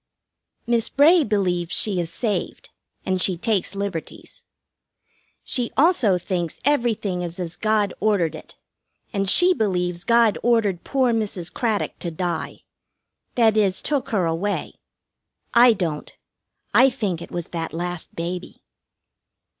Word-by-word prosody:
Miss 235 Hz, -1 st, +1 dB
Bray 315 Hz, +4 st, +5 dB
believes 185 Hz, -6 st, -1 dB
she 200 Hz, -4 st, +1 dB
is 170 Hz, -1 st, -3 dB
saved, 215 Hz, +2 st, -3 dB, 0.3 s
and 185 Hz, -1 st, 0 dB
she 185 Hz, -2 st, +2 dB
takes 200 Hz, -1 st, -1 dB
liberties. 195 Hz, -5 st, -6 dB, 1.0 s
She 245 Hz, -2 st, -1 dB
also 265 Hz, -, +4 dB
thinks 175 Hz, -2 st, -3 dB
everything 230 Hz, -10 st, 0 dB
is 175 Hz, +1 st, -6 dB
as 175 Hz, -1 st, -4 dB
God 215 Hz, -3 st, +1 dB
ordered 200 Hz, -6 st, +1 dB
it, -, -, -11 dB, 0.6 s
and 195 Hz, -2 st, 0 dB
she 360 Hz, -, +6 dB
believes 180 Hz, -, -1 dB
God 230 Hz, -2 st, +3 dB
ordered 220 Hz, -7 st, +1 dB
poor 260 Hz, -3 st, +1 dB
Mrs. 195 Hz, -6 st, -3 dB
Craddock 220 Hz, -4 st, -2 dB
to 175 Hz, -, -3 dB
die 175 Hz, +1 st, -4 dB, 0.7 s
that 225 Hz, -3 st, +4 dB
is, 195 Hz, -3 st, +2 dB
took 285 Hz, -3 st, -2 dB
her 195 Hz, -6 st, +1 dB
away. 170 Hz, +5 st, -2 dB, 0.8 s
I 240 Hz, 0 st, +7 dB
don't. 165 Hz, -7 st, -4 dB, 0.6 s
I 265 Hz, -, +6 dB
think 205 Hz, -9 st, -3 dB
it -, -, -9 dB
was 175 Hz, -2 st, -5 dB
that 165 Hz, -2 st, -4 dB
last 175 Hz, +1 st, -5 dB
baby. 175 Hz, +2 st, -6 dB
200 Hz, 130 wpm, -22 LUFS, 175-230 Hz, 1.0 s, I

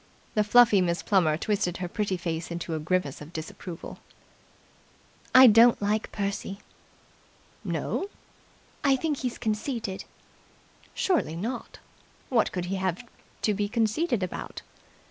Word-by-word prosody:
The 210 Hz, -, +3 dB
fluffy 215 Hz, -2 st, +6 dB
Miss 170 Hz, -1 st, 0 dB
Plummer 170 Hz, -7 st, +3 dB
twisted 180 Hz, -2 st, -1 dB
her 180 Hz, -, -3 dB
pretty 195 Hz, 0 st, -2 dB
face 170 Hz, -1 st, -3 dB
into 170 Hz, -1 st, -4 dB
a 160 Hz, -, -1 dB
grimace 155 Hz, -3 st, -1 dB
of 150 Hz, +2 st, -10 dB
disapproval. 165 Hz, +2 st, -7 dB, 1.4 s
"I 260 Hz, 0 st, +11 dB
don't 230 Hz, +1 st, +7 dB
like 210 Hz, +1 st, -1 dB
Percy." 200 Hz, -1 st, -3 dB, 1.1 s
"No!" 390 Hz, -, -2 dB, 0.7 s
"I 275 Hz, -2 st, +5 dB
think 295 Hz, +2 st, -1 dB
he's 250 Hz, -2 st, -3 dB
conceited." 215 Hz, -2 st, -3 dB, 0.9 s
"Surely 335 Hz, -, +1 dB
not? 230 Hz, +8 st, -5 dB, 0.5 s
What 230 Hz, -4 st, +2 dB
could 180 Hz, -1 st, -3 dB
he 190 Hz, +2 st, -2 dB
have 190 Hz, +3 st, -2 dB, 0.4 s
to 210 Hz, -, +3 dB
be 205 Hz, 0 st, -1 dB
conceited 230 Hz, -, +1 dB
about?" 185 Hz, -, -6 dB
200 Hz, 125 wpm, -27 LUFS, 175-230 Hz, 1.4 s, I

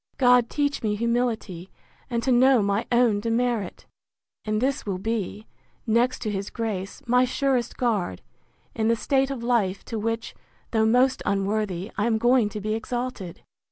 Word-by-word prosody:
—God 245 Hz, -2 st, +5 dB
teach 285 Hz, -1 st, -1 dB
me 210 Hz, -2 st, 0 dB
humility, 230 Hz, -6 st, -1 dB, 0.4 s
and 235 Hz, -2 st, -1 dB
to 260 Hz, -, +1 dB
know 255 Hz, -2 st, +5 dB
my 200 Hz, +2 st, 0 dB
own 235 Hz, -4 st, +3 dB
demerit! 230 Hz, -2 st, -1 dB, 0.6 s
And 215 Hz, 0 st, -1 dB
this 265 Hz, +3 st, 0 dB
will 195 Hz, -4 st, -3 dB
be, 215 Hz, 0 st, -3 dB, 0.4 s
next 240 Hz, +3 st, +1 dB
to 215 Hz, -, -2 dB
his 195 Hz, 0 st, -3 dB
grace, 215 Hz, +1 st, -4 dB
my 250 Hz, +1 st, +4 dB
surest 255 Hz, -1 st, 0 dB
guard, 205 Hz, -, -1 dB, 0.5 s
in 220 Hz, -1 st, 0 dB
the 230 Hz, -, +3 dB
state 270 Hz, +3 st, +1 dB
of 265 Hz, -4 st, -5 dB
life 215 Hz, -6 st, 0 dB
to 225 Hz, -, -4 dB
which, 225 Hz, +1 st, -3 dB, 0.4 s
though 220 Hz, -1 st, +2 dB
most 255 Hz, +3 st, +3 dB
unworthy, 200 Hz, -1 st, -1 dB
I 210 Hz, -, +2 dB
am 225 Hz, -2 st, +2 dB
going 240 Hz, -1 st, +3 dB
to 210 Hz, -, -6 dB
be 215 Hz, +1 st, -2 dB
exalted. 225 Hz, -5 st, -4 dB
230 Hz, 160 wpm, -25 LUFS, 210-245 Hz, 0.6 s, God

